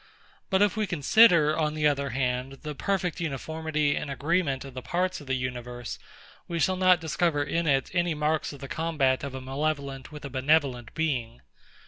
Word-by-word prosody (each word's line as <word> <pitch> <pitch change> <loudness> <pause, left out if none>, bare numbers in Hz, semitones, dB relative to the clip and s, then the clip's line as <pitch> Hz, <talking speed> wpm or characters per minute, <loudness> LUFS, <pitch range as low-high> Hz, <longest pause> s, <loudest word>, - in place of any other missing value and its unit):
But 190 0 +4
if 205 - +2
we 215 -1 0
consider, 170 -1 +5
on 155 -1 0
the 155 -1 0
other 140 -1 +2
hand, 125 +1 -1
the 150 -1 -4
perfect 185 +2 -1
uniformity 155 -1 -1
and 150 - -4
agreement 140 -1 0
of 135 - -9
the 130 - -6
parts 180 +1 -1
of 145 - -13
the 130 - 0
universe, 125 -1 -5 0.5
we 170 -1 -3
shall 185 +4 +2
not 185 -1 +5
discover 160 -1 0
in 165 +3 -1
it 135 -2 +2
any 175 -2 +1
marks 150 +1 0
of 140 - -11
the 135 - -6
combat 145 -5 0
of 140 -2 -5
a 130 - -5
malevolent 140 0 -3
with 150 -1 -9
a - - -5
benevolent 135 -3 +1
being. 130 - -2
150 Hz, 185 wpm, -27 LUFS, 135-165 Hz, 0.5 s, consider